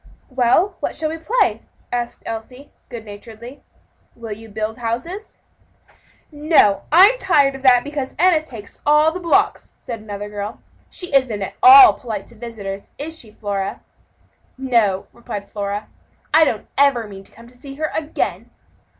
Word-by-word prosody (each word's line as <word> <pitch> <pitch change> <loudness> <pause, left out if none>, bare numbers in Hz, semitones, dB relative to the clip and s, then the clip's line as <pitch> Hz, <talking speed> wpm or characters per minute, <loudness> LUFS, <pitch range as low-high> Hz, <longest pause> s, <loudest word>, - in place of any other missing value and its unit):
"Well, 265 +10 +2
what - - -3
shall 310 -1 -1
we 325 - -6
play?" 455 +10 +1 0.3
asked 240 -1 -4
Elsie, 250 +5 -8 0.2
good 230 -2 -8
naturedly. 225 +5 -11 0.5
"Will 230 -2 -9
you 220 +2 -8
build 215 +2 -4
houses?" 255 - -5 0.9
"No, 295 -9 +3
I'm 395 +10 +6
tired 295 - +3
of 270 - -9
that, 250 -2 +5
because 285 -2 -5
Enna 350 -1 +4
takes 230 -10 -12
all 300 +2 +4
the 360 - -6
blocks," 340 -2 +1
said 235 -2 -7
another 205 -1 -7
little 205 +1 -5
girl. - - -27 0.3
"She 360 -5 -5
isn't 235 -7 +1
at - - -6
all 390 0 +10
polite 215 -5 -6
to 235 - -15
visitors, 205 -4 -7
is 320 +3 -6
she, 225 - -12
Flora?" 200 -2 -4 0.8
"No," 230 -8 +1
replied 220 -4 -8
Flora, 205 0 -4
"and - - -30 0.5
I 320 0 +6
don't 225 -7 -2
ever 265 -6 +3
mean 195 -1 -11
to - - -17
come 230 +2 -16
to 245 - -19
see 275 +2 -11
her 310 +1 -3
again." 315 -1 -3
245 Hz, 165 wpm, -20 LUFS, 215-305 Hz, 0.9 s, all